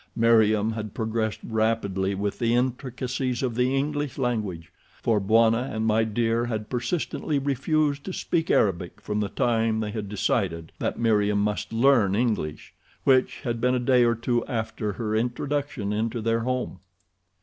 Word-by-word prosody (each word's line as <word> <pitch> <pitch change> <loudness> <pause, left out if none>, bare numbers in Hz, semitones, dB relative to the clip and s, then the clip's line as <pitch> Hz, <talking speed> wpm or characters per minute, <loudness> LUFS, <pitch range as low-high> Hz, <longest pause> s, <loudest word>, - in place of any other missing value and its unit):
Meriem 110 -2 +4
had 110 -2 -6
progressed 110 -1 -2
rapidly 105 -4 0
with 100 +1 -3
the 120 -1 +2
intricacies 125 0 -2
of 125 -3 0
the 125 +3 +1
English 145 0 -2
language, 105 -10 -2 0.3
for 110 -3 +2
Bwana 115 +4 +3
and 110 0 -2
My 110 0 +3
Dear 115 +1 0
had 110 -3 -4
persistently 140 +4 -1
refused 145 +1 0
to 190 - -4
speak 170 -2 -1
Arabic 90 -1 +1
from 105 0 -3
the 105 -1 -1
time 115 -2 +1
they 105 -1 -2
had 105 -2 -5
decided 90 -5 -1
that - - -2
Meriem 105 -3 +2
must 105 +1 -2
learn 115 -4 +4
English, 105 -10 -2 0.3
which 130 -1 +3
had 120 -4 -3
been 125 +1 +2
a - - +1
day 125 0 +4
or 120 0 +3
two 120 +1 0
after 110 -2 -3
her 110 +2 -2
introduction 125 -2 -2
into 115 +2 -1
their 115 +1 +1
home. 125 -5 -2
115 Hz, 160 wpm, -25 LUFS, 105-125 Hz, 0.3 s, Meriem